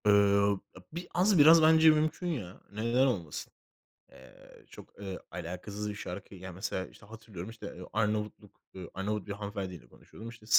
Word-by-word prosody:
Iıı, 100 0 +5 0.2
a - - -10
bi 175 +2 -5
az 190 +2 +4
biraz 160 +3 +9
bence 160 0 +7
mümkün 155 +3 +2
ya, 105 - -4
neden 115 +5 +2
olmasın? 85 - -3 0.6
Eee, 65 -1 -17
çok, - - -13
eee, 95 -2 -5
alakasız 95 +5 -5
bir 105 - -5
şarkı. 100 0 -7
Ya, 95 0 -8
mesela, 95 0 -3
işte, - - -17
hatırlıyorum, 110 -3 -9
işte, 110 -3 -8 0.2
Arnavutluk, 105 -1 -2
ııı, 90 -3 -7
Arnavut 105 +1 -2
bir - - -4
hanımefendiyle 100 - -6
konuşuyordum. 110 - -12
İşte, 115 -2 -13
105 Hz, 160 wpm, -31 LUFS, 95-115 Hz, 0.6 s, biraz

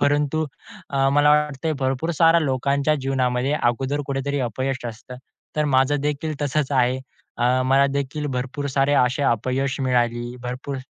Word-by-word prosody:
परंतु 145 +2 +1 0.5
अ, 135 -1 +2
मला 145 +1 +4
वाटतंय 150 +1 +1
भरपूर 135 +5 -1
साऱ्या 165 0 +5
लोकांच्या 140 +1 +1
जीवनामध्ये 130 0 0
अगोदर 130 +4 0
कुठेतरी 140 +1 -2
अपयश 130 +2 -2
असतं, 120 +2 -9 0.4
तर 150 - +2
माझं 135 +2 +2
देखील 150 +1 -2
तसंच 145 0 0
आहे. 130 -1 +2 0.4
अ, 125 +2 +2
मलादेखील 140 +2 +1
भरपूर 135 +1 -3
सारे 135 +1 +3
असे 130 +3 -1
अपयश 130 +2 0
मिळाली, 120 -1 0
भरपूर 125 +3 -5
135 Hz, 140 wpm, -22 LUFS, 125-145 Hz, 0.5 s, साऱ्या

